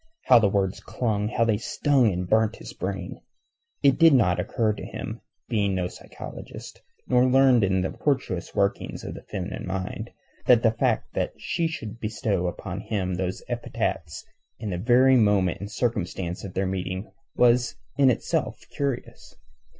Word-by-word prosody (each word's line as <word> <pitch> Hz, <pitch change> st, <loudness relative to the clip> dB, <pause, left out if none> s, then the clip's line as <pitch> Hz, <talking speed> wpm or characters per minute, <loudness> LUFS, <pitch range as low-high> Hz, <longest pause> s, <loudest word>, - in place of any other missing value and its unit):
How 125 Hz, -2 st, +7 dB
the 105 Hz, -3 st, +3 dB
words 95 Hz, -1 st, 0 dB
clung, 105 Hz, -4 st, -1 dB
how 115 Hz, +1 st, +1 dB
they 110 Hz, -2 st, +2 dB
stung 130 Hz, -2 st, +2 dB
and 90 Hz, 0 st, -3 dB
burnt 110 Hz, +3 st, +2 dB
his -, -, -10 dB
brain! 95 Hz, -1 st, -5 dB, 0.6 s
It 140 Hz, +2 st, +4 dB
did 165 Hz, -3 st, +7 dB
not 100 Hz, -8 st, +3 dB
occur 110 Hz, -4 st, 0 dB
to -, -, -8 dB
him, -, -, -6 dB, 0.3 s
being 100 Hz, -4 st, +1 dB
no 90 Hz, -1 st, 0 dB
psychologist, -, -, -10 dB, 0.3 s
nor 125 Hz, 0 st, +4 dB
learned 130 Hz, -3 st, +5 dB
in 95 Hz, -1 st, +2 dB
the 95 Hz, -, -1 dB
tortuous 130 Hz, -, -2 dB
workings 100 Hz, 0 st, -1 dB
of -, -, -5 dB
the -, -, -9 dB
feminine 95 Hz, -2 st, -5 dB
mind, 95 Hz, 0 st, -4 dB, 0.4 s
that 120 Hz, -2 st, +6 dB
the 115 Hz, -, +5 dB
fact 110 Hz, -, 0 dB
that -, -, -1 dB
she 165 Hz, -, -1 dB
should 115 Hz, -9 st, -6 dB
bestow 105 Hz, -4 st, -1 dB
upon 90 Hz, +1 st, -5 dB
him 95 Hz, -3 st, -2 dB
those 90 Hz, 0 st, -3 dB
epithets 80 Hz, -2 st, -3 dB, 0.3 s
in 105 Hz, -3 st, -4 dB
the 90 Hz, -, -2 dB
very 125 Hz, +5 st, +5 dB
moment 100 Hz, -5 st, +3 dB
and 100 Hz, +1 st, -7 dB
circumstance 95 Hz, -7 st, -2 dB
of 95 Hz, -2 st, -8 dB
their 95 Hz, -, +1 dB
meeting 95 Hz, +1 st, -3 dB, 0.2 s
was 125 Hz, 0 st, +3 dB, 0.2 s
in 140 Hz, -2 st, +5 dB
itself 125 Hz, -, -1 dB
curious. 140 Hz, -3 st, -4 dB
105 Hz, 165 wpm, -25 LUFS, 95-125 Hz, 0.6 s, How